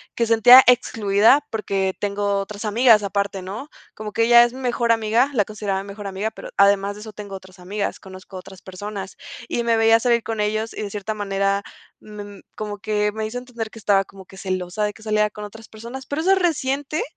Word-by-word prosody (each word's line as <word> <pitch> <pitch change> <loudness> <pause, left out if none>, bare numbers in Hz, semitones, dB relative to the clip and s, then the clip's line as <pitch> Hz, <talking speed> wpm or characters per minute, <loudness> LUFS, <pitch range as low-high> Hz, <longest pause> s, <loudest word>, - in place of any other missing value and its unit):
que 235 - +1
se 230 - +3
sentía 245 +4 +9
excluida 225 +3 +3
porque 195 -3 -2
tengo 200 0 -1
otras 200 +2 -6
amigas 225 0 +5
aparte, 200 -1 -2
¿no? 205 +10 -7 0.3
Como 215 -1 -7
que 230 - +2
ella 240 0 +8
es 240 +1 -1
mi 265 - -9
mejor 240 -2 0
amiga 230 +4 +2
la 210 -5 +2
consideraba 205 -2 -3
mi - - -13
mejor 205 +1 -9
amiga, 195 +3 -3
pero - - -10
además 200 0 +3
de 210 - -11
eso 215 -1 -10
tengo 200 -1 -8
otras 190 0 -13
amigas, 200 +3 -4
conozco 190 0 -12
otras 190 +1 -12
personas. 195 +1 -8 0.3
Y 235 - -1
me 230 -1 +2
veía 225 0 +5
salir 235 -1 +2
con 225 -1 -4
ellos 215 +2 -2
y - - -5
de 200 - -6
cierta 210 +1 -4
manera 200 0 -1 0.4
me 205 -1 -11
como 210 -1 -5
que 210 -1 0
me 220 0 -3
hizo 245 +3 -5
entender 235 -3 -7
que 225 - -12
estaba 195 -1 +2
como 195 -1 -14
que 190 - -16
celosa 185 +1 -3
de 210 - -3
que 220 - -17
saliera 215 -1 +1
con 210 0 -9
otras 220 +2 -12
personas. 235 +5 -9
Pero 290 +2 -3
eso 375 +3 +2
es 385 - +2
reciente, 290 -3 -1
210 Hz, 220 wpm, -21 LUFS, 200-230 Hz, 0.4 s, sentía